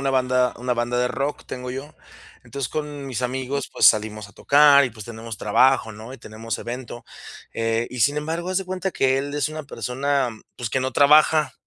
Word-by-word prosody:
una 135 0 0
banda 125 -1 +2
una 125 0 -1
banda 120 +1 -1
de 125 - +1
rock, 140 +3 -3
tengo 125 0 -6
yo. 135 +4 -7 0.5
Entonces, 140 -4 -4
con 145 -1 -5
mis 125 -1 -4
amigos, 130 +2 -3
pues, - - +4
salimos 105 -1 +2
a - - -19
tocar 140 +2 +5
y, 125 - -3
pues, 110 -2 -11
tenemos 115 0 -8
trabajo, 120 +3 +3
¿no? 110 +4 -10
Y 135 - -10
tenemos 110 +1 -6
evento. 120 0 -7 0.5
Eh, 115 +1 -1
y 125 - -6
sin 145 +6 +3
embargo, 165 +4 -3
haz 185 - +1
de 195 - -5
cuenta 185 +1 -3
que 135 0 +2
él 145 +1 -4
es 145 - 0
una 155 0 -7
persona, 140 0 -1 0.3
pues, 120 -3 -5
que 130 - 0
no 130 0 -2
trabaja, 150 +1 +5
130 Hz, 205 wpm, -23 LUFS, 120-145 Hz, 0.5 s, tocar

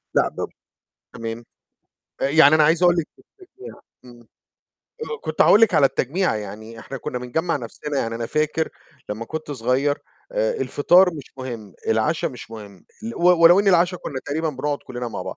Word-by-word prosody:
لأ، - - +4
بب - - -5 0.7
تمام 115 +1 -6 0.8
آآ، 135 - +1
يعني 155 0 +6
أنا 155 - +5
عايز 165 +3 +3
أقول 175 -1 +5
لِك 165 -2 -1
التجميعة 390 +1 -15 0.2
إمم 120 -1 -14 0.8
آآ، 460 0 -4
كنت - - +1
هأقُول 210 - +6
لِك 225 - +4
على 140 - +6
التجميعة 155 - -1
يعني 110 +2 -8
إحنا 135 +4 -8
كنّا 125 - -4
بنجمّع 160 +8 -1
نَفْسنا، 140 +3 -5
يعني 115 -3 -2
أنا 115 0 -4
فاكر 155 +4 -1 0.4
لمّا 110 +2 -4
كنت 155 +4 -6
صغيّر، 135 +2 0 0.3
آآ، - - +1
الفطار 180 - +4
مش 145 -4 -8
مهم، 115 -7 -7
العشا 155 +10 +1
مش 125 -7 -8
مهم، 105 -4 -11 0.2
ال 230 - -5
و - - -5 0.2
ولو 175 +4 +8
إن 205 - +1
العشا 180 0 +3
كنّا 140 -6 -6
تقريبًا 160 +3 -2
بنقعد 145 0 -3
كلنّا 120 -1 -5
مع - - -6
بعض - - -7
145 Hz, 180 wpm, -22 LUFS, 120-170 Hz, 0.8 s, ولو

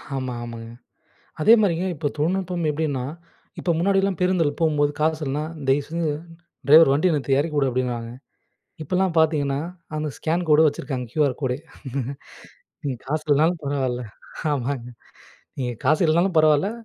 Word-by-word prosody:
ஆமா, 130 -2 -3
ஆமாங்க. 115 -1 -8 0.7
அதே 215 +8 +7
மாரிங்க, 180 -3 +1
இப்ப 145 -1 -2
தொழில்நுட்பம் 175 +2 -1
எப்படீன்னா, 145 -4 -2 0.5
இப்ப - - -3
முன்னாடிலாம் 195 +1 +1
பேருந்தில 180 -5 +2
போகும்போது 150 -3 +2
காசு 155 +1 +1
இல்லன்னா, 145 +2 -2 0.2
"தயவுசெஞ்சு 150 +4 0 0.6
டிரைவர் 155 0 +8
வண்டிய 160 +5 +2
நிறுத்து. 135 -2 0
இறக்கி 150 +1 -2
வுடு" 135 -2 +2
அப்படீன்னுவாங்க. 120 -2 -2 0.7
இப்பல்லாம் 185 +3 0
பார்த்தீங்கன்னா, 145 -3 +2 0.4
அந்த 155 0 -2
ஸ்கேன் 170 +2 -1
கோடு 150 +1 +6
வச்சுருக்காங்க. 135 -3 -3
QR 145 -4 +1
code! 130 -2 -1 1.3
"நீங்க 140 -3 -2
காசு 155 +2 -1
இல்லன்னாலும் 155 +3 +2
பரவால்ல" 130 -3 -1 0.5
ஆமாங்க. 130 -3 -2 0.7
"நீங்க 125 -2 -2
காசு 155 +5 +3
இல்லனாலும் 170 +3 +2
பரவால்ல, 155 +4 +4
150 Hz, 130 wpm, -23 LUFS, 135-165 Hz, 1.3 s, டிரைவர்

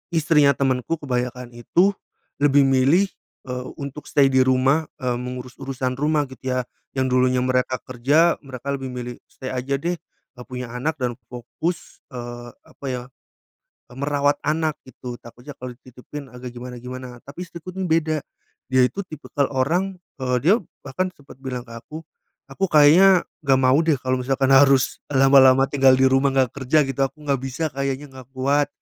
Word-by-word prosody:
istrinya 150 -3 +4
temenku 135 +3 0
kebanyakan 125 -3 -3
itu 170 - +2 0.5
lebih 145 -1 +5
milih, 135 +8 +4 0.4
eee, 125 0 -5
untuk 140 +1 -7
stay 135 -2 +4
di 130 - +5
rumah, 130 +4 +3
eee, 125 -3 -1
mengurus 125 0 -6
urusan 130 -1 -2
rumah 150 0 +2
gitu 130 0 -4
ya. 130 - +1 0.4
Yang 130 0 +1
dulunya 125 0 +2
mereka 130 0 +1
kerja, 145 +7 +2
mereka 135 0 -6
lebih 135 -1 -4
milih 125 0 -5
stay 130 - -7
aja 130 +2 -1
deh, 170 +6 -2
eee, 125 -1 -17
punya 125 -2 -6
anak 150 +6 -2
dan 125 -2 -1 0.2
fokus, 125 +8 -5 0.2
eee, 120 0 -7 0.2
apa 140 - -13
ya, 125 -1 -3 0.9
e - - -14
merawat 145 0 +1
anak 155 0 0
gitu, 125 -1 -8
takutnya 125 +5 -12
kalau 125 -1 -7
dititipin 130 +3 -11
agak 125 0 -9
gimana-gimana. 125 0 -8
Tapi 140 +5 -9
istriku 175 0 -8
tuh 190 -1 -3
beda, 160 -2 +1 0.5
dia 130 0 +4
itu 195 - -4
tipikal 145 -2 -2
orang, 175 +9 0 0.3
eee, 125 -1 +1
dia 190 - +7 0.3
bahkan 185 +8 -1
sempat 145 -3 -17
bilang 125 -2 -5
ke 115 - -12
aku, 155 +7 -9 0.4
"Aku 165 +8 -1
kayaknya 170 +5 +6 0.2
gak 135 -3 +3
mau 130 0 +4
deh 160 -4 +2
kalau 130 0 -1
misalkan 135 +1 +1
harus 135 -1 +4
lama-lama 135 -1 +6
tinggal 135 -2 +4
di 130 - +4
rumah 135 +1 +4
gak 130 -3 +2
kerja 140 +2 +2
gitu, 135 0 -3
aku 135 - -8
gak 140 -3 0
bisa 135 +4 -3
kayaknya 140 0 -3
gak 130 -1 -12
kuat." 140 +3 +1
135 Hz, 165 wpm, -22 LUFS, 125-145 Hz, 0.9 s, dia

